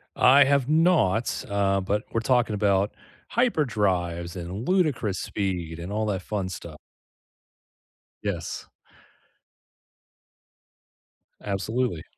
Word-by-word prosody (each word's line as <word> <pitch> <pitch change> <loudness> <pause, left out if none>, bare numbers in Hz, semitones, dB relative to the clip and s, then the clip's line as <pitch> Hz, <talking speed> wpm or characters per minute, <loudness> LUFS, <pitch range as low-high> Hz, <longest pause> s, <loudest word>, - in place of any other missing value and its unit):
I 135 +2 +7
have 140 -2 +2
not, 155 - +2
uh, 100 -1 +1
but 105 +3 -1
we're 115 - 0
talking 120 -3 +2
about 100 -1 +2 0.4
hyperdrives 95 - 0
and 95 +6 -6
ludicrous 140 - +1
speed 90 -5 -3
and 85 +3 -6
all 110 +1 -1
that 95 -3 -1
fun 95 -2 -3
stuff. 95 - -8 1.5
Yes. - - -4 2.8
Absolutely. 105 -1 -2
105 Hz, 95 wpm, -25 LUFS, 95-125 Hz, 2.8 s, I